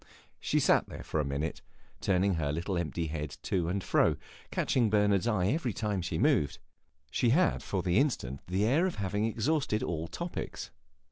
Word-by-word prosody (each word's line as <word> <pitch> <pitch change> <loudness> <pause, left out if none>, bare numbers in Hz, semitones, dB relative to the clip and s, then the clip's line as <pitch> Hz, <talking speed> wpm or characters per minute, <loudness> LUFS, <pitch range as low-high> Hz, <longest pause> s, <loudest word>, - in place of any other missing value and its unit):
She - - +1
sat - - +3
there - - -8
for 80 - -2
a - - +2
minute, 70 +3 -3 0.4
turning 95 +1 +2
her 75 -4 -1
little 85 +5 -2
empty 85 -1 -2
head 75 -2 -4
to 85 -3 0
and 95 +1 -1
fro, - - +3
and - - -10 0.3
catching 120 -4 +1
Bernard's 105 -1 +3
eye 100 -5 +2
every 135 -5 0
time 105 -3 -1
she 90 - -2
moved; 70 - +2 0.5
she 120 - +2
had 170 +9 +3
for 95 -3 -2
the 90 +2 +3
instant 70 - -1
the 95 +4 +1
air 150 +11 +3
of 180 - -4
having 105 +2 -1
exhausted 115 +1 0
all 80 -1 -2
topics. 175 - -5
95 Hz, 185 wpm, -30 LUFS, 85-115 Hz, 0.5 s, sat